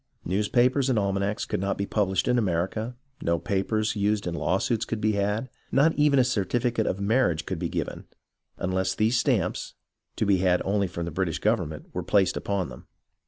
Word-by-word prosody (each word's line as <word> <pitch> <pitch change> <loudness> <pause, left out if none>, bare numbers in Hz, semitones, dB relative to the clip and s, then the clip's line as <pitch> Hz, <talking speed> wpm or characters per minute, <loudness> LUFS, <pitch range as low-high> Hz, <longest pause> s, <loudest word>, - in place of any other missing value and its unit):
News 100 +4 0
papers 130 +2 +3
and 125 - +2
almanacs 100 0 0
could - - -2
not 100 +1 -1
be 100 - -1
published 95 -3 0
in 125 0 +3
America, 105 +5 -1 0.3
no 85 0 +1
papers 110 +4 -1
used 105 0 0
in 85 - -2
lawsuits 105 +6 0
could 115 -1 -3
be 110 0 +2
had, 105 +4 0 0.2
not 155 +4 +4
even 145 -1 +3
a 130 - +6
certificate 120 0 0
of 95 - -1
marriage 100 -7 +1
could - - -3
be - - -2
given, - - -4 0.5
unless 95 0 -1
these 110 +3 +2
stamps, - - 0 0.4
to - - 0
be 100 -2 +4
had 90 -1 +3
only 100 0 +1
from 85 -1 -5
the 85 - -4
British 85 -1 -1
government, 90 -9 -1
were - - -2
placed 100 -3 +2
upon 100 -3 -1
them. - - -12
100 Hz, 190 wpm, -26 LUFS, 95-115 Hz, 0.5 s, a